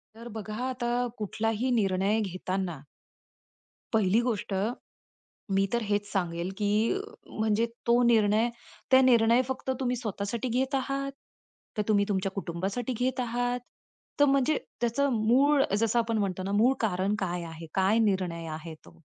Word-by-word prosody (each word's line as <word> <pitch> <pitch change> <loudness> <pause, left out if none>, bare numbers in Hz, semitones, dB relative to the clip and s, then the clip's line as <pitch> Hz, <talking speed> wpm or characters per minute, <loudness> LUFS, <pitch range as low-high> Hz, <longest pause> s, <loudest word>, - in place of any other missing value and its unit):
तर 230 +1 -10
बघा 215 0 -5
आता 245 -2 -2 0.3
कुठलाही 225 +4 -1
निर्णय 200 -1 +2
घेताना 185 -3 -3 1.1
पहिली 215 0 +3
गोष्ट 225 -5 -2 1.0
मी 195 0 +3
तर 235 -1 +1
हेच 205 -1 -1
सांगेल, 175 -1 -1
की 205 -1 0 0.7
म्हणजे 220 +1 +2 0.2
तो 240 +1 +4
निर्णय 225 -1 +4 0.4
त्या 260 0 +7
निर्णय 235 -1 +5
फक्त 265 0 -3
तुम्ही 250 -1 0
स्वतःसाठी 220 +1 -3
घेत 260 +3 0
आहात, 275 +1 -1 0.6
तर 210 - +1
तुम्ही 205 -2 +4
तुमच्या 195 -1 -1
कुटुंबासाठी 195 +7 -3
घेत 255 0 0
आहात 245 +1 -1 0.6
तर - - +8
म्हणजे 275 +1 +3 0.2
त्याचं 250 +3 +1
मूळ 265 +6 +4 0.2
जसं 225 +2 +2
आपण 230 -1 +1
म्हणतो 190 -2 -1
ना 195 +1 -3
मूळ 235 +6 +4
कारण 195 -2 0
काय 175 -2 -2
आहे? 165 0 -8
काय 195 +3 +3
निर्णय 185 -6 0
आहे 160 +1 -7
तो? 80 -2 -17
220 Hz, 140 wpm, -28 LUFS, 195-245 Hz, 1.1 s, तर